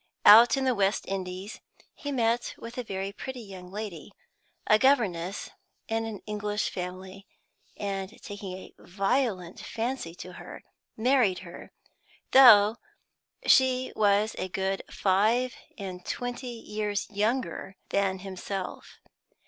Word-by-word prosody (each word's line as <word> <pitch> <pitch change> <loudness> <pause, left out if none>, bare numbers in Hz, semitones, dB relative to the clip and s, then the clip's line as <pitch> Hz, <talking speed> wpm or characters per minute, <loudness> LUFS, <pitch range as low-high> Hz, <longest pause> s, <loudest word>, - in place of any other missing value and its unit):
Out 230 +5 +9
in 265 - 0
the 260 - +3
West 200 -2 +1
Indies 190 +1 -5 0.3
he 285 - -6
met 240 -2 0
with 230 +1 -9
a 195 -4 -4
pretty 260 +4 -7
young 190 -4 -10
lady, 205 -3 -7 0.5
a 215 - +5
governess 200 -9 +1 0.4
in 225 0 -1
an 220 -3 -7
English 210 0 -2
family, 185 +2 -7 0.5
and, 195 -2 -3
taking 200 -2 -7
a 185 - -10
violent 195 -1 -1
fancy 230 -7 -4
to 180 0 -9
her, - - -10 0.3
married 235 -5 +3
her, 170 - -11 0.6
though 225 -4 +8 0.7
she 260 -1 +4
was 205 +1 +2
a 185 - -3
good 190 +1 -1
five 220 +6 +2 0.2
and 185 -3 -7
twenty 245 +4 -4
years 210 -3 -3
younger 215 -1 -1
than 195 -1 +1
himself. 190 0 -6
205 Hz, 120 wpm, -28 LUFS, 190-235 Hz, 0.7 s, Out